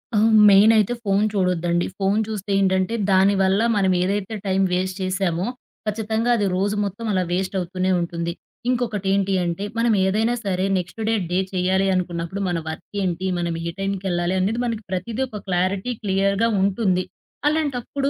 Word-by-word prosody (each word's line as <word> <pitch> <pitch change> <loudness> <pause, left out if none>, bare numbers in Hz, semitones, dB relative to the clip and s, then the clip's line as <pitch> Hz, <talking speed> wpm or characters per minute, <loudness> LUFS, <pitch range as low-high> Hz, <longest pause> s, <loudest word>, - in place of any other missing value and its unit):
హ్మ్. 215 +2 +4 0.2
మెయినయితే 215 +2 +5
phone 200 0 +2
చూడొద్దండి. 175 -3 +1
Phone 200 +2 +1
చూస్తే 205 -2 -4
ఏంటంటే, 190 +2 +1 0.2
దానివల్ల 195 +1 +3 0.2
మనమేదైతే 190 +2 +1
టైమ్ 195 0 +2
వేస్ట్ 185 +1 -1
చేశామో, 185 -2 -1 0.4
ఖచ్చితంగా 220 +2 -1
అది 205 - +1
రోజు 200 +3 0
మొత్తం 200 +4 -5
అలా 185 -2 +1
వేస్ట్ 185 +2 -1
అవుతూనే 185 +1 -1
ఉంటుంది. 170 0 -3 0.4
ఇంకొకటి 225 -6 -1
ఏంటి 195 0 +1
అంటే, 170 +3 -2
మనం 230 0 +2
ఏదైనా 220 +5 +1
సరే 190 -1 0
నెక్స్ట్ 180 +5 -5
డే, - - +2 0.2
డే 180 - +2
చేయాలి 190 +1 +1
అనుకున్నప్పుడు 175 +1 -3
మన 175 - -1
వర్క్ 160 - -7 0.2
ఏంటి, 180 0 -2
మనం 170 -1 -1
ఏ - - -2
టైంకెళ్ళాలి 190 -3 -1
అనేది 205 +6 0
మనకి 225 -2 -3
ప్రతిదీ 200 +7 -3
ఒక 215 -4 -7
క్లారిటీ 190 +5 0
క్లియర్‌గా 200 +3 +1
ఉంటుంది. 190 -2 +1 0.4
అలాంటప్పుడు 280 -2 -1
195 Hz, 150 wpm, -22 LUFS, 185-210 Hz, 0.4 s, మెయినయితే